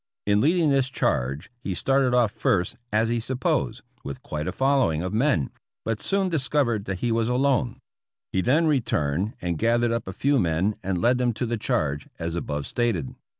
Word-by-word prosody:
In 105 Hz, 0 st, +3 dB
leading 160 Hz, +2 st, +3 dB
this 135 Hz, -2 st, +2 dB
charge, 70 Hz, -, -1 dB
he 100 Hz, -6 st, -4 dB
started 135 Hz, +4 st, +2 dB
off 120 Hz, -4 st, +3 dB
first, 90 Hz, -5 st, 0 dB, 0.2 s
as 110 Hz, +2 st, +2 dB
he 120 Hz, 0 st, +1 dB
supposed, 130 Hz, 0 st, -1 dB, 0.2 s
with 70 Hz, -, -7 dB
quite 75 Hz, 0 st, -4 dB
a -, -, 0 dB
fol 135 Hz, +1 st, +2 dB
lowing 80 Hz, -10 st, +1 dB
of 95 Hz, -, -3 dB
men, 120 Hz, -, +1 dB, 0.3 s
but 115 Hz, -1 st, -2 dB
soon 195 Hz, -1 st, +1 dB
discovered 140 Hz, -, 0 dB
that 95 Hz, -2 st, -4 dB
he 120 Hz, -, +1 dB
was 115 Hz, 0 st, +1 dB
alone. 130 Hz, -1 st, +1 dB, 0.5 s
He 95 Hz, -, +1 dB
then 145 Hz, -, +3 dB
returned 100 Hz, -, 0 dB
and 85 Hz, -3 st, -1 dB
gathered 120 Hz, 0 st, +2 dB
up 115 Hz, -3 st, -2 dB
a 95 Hz, -, -5 dB
few 140 Hz, +6 st, +2 dB
men 90 Hz, +3 st, +1 dB
and 95 Hz, -1 st, -1 dB
led 125 Hz, +4 st, +3 dB
them 120 Hz, -1 st, +1 dB
to 125 Hz, -, -2 dB
the 120 Hz, 0 st, -1 dB
charge, 75 Hz, -8 st, -1 dB
as 80 Hz, 0 st, -3 dB
above 75 Hz, -4 st, -3 dB
stated. 105 Hz, -, -1 dB
115 Hz, 195 wpm, -25 LUFS, 90-130 Hz, 0.5 s, In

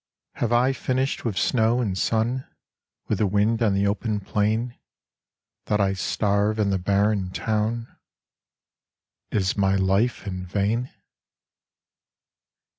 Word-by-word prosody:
Have 115 Hz, -, -1 dB
I 125 Hz, +3 st, +3 dB
finished 130 Hz, +1 st, -1 dB
with 105 Hz, -5 st, -2 dB
snow 115 Hz, 0 st, +2 dB
and 105 Hz, -6 st, -1 dB
sun, 115 Hz, +6 st, 0 dB, 0.6 s
With -, -, -1 dB
the 105 Hz, -, +3 dB
wind 105 Hz, +4 st, +1 dB
on 105 Hz, -4 st, +3 dB
the 100 Hz, +1 st, +1 dB
open 105 Hz, +1 st, -1 dB
plain, 110 Hz, +5 st, -1 dB, 0.9 s
That 105 Hz, -, +1 dB
I 95 Hz, -1 st, +2 dB
starve 100 Hz, +2 st, 0 dB
in 105 Hz, -2 st, +1 dB
the 95 Hz, -, +1 dB
barren 100 Hz, 0 st, +1 dB
town 110 Hz, +4 st, -1 dB, 1.4 s
Is 95 Hz, -3 st, 0 dB
my 95 Hz, -1 st, +2 dB
life 95 Hz, +6 st, +1 dB
in 95 Hz, -2 st, -4 dB
vain? 105 Hz, +6 st, 0 dB
105 Hz, 120 wpm, -24 LUFS, 100-115 Hz, 1.4 s, I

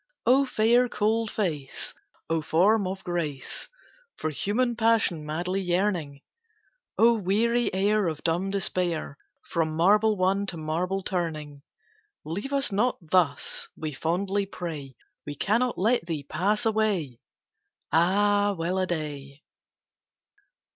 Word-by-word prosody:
O 270 Hz, +3 st, +4 dB
fair 240 Hz, +2 st, +3 dB
cold 220 Hz, +1 st, 0 dB
face! 155 Hz, -12 st, -3 dB, 0.3 s
O 165 Hz, 0 st, 0 dB
form 195 Hz, +6 st, +3 dB
of 190 Hz, +1 st, -5 dB
grace, 155 Hz, -7 st, -4 dB, 0.5 s
For 155 Hz, -, -2 dB
human 235 Hz, -, 0 dB
passion 220 Hz, -8 st, +2 dB
madly 180 Hz, +5 st, -2 dB
yearning! 175 Hz, -6 st, -1 dB, 0.8 s
O 235 Hz, +1 st, +6 dB
weary 230 Hz, +4 st, +1 dB
air 205 Hz, +1 st, +2 dB
of 155 Hz, -2 st, -4 dB
dumb 175 Hz, +4 st, 0 dB
despair, 175 Hz, -6 st, -1 dB, 0.3 s
From 160 Hz, -2 st, 0 dB
marble 210 Hz, +5 st, +4 dB
won, 195 Hz, +2 st, +1 dB
to 175 Hz, -, -4 dB
marble 175 Hz, +5 st, -2 dB
turning! 155 Hz, -6 st, -3 dB, 0.6 s
"Leave 200 Hz, -, -4 dB
us 275 Hz, -3 st, 0 dB
not 230 Hz, +6 st, +1 dB
thus!" 165 Hz, -6 st, +1 dB
we 155 Hz, -1 st, -4 dB
fondly 195 Hz, +7 st, -1 dB
pray. 155 Hz, -9 st, -6 dB, 0.3 s
"We 145 Hz, -, -4 dB
cannot 235 Hz, -, +1 dB
let 220 Hz, -2 st, +1 dB
thee 155 Hz, -4 st, -3 dB
pass 200 Hz, -, 0 dB
away!" 205 Hz, -, 0 dB, 0.7 s
Ah, 205 Hz, +4 st, +3 dB
well 175 Hz, +3 st, -1 dB
a 185 Hz, -, 0 dB
day! 150 Hz, -4 st, -5 dB
185 Hz, 120 wpm, -26 LUFS, 160-210 Hz, 0.8 s, O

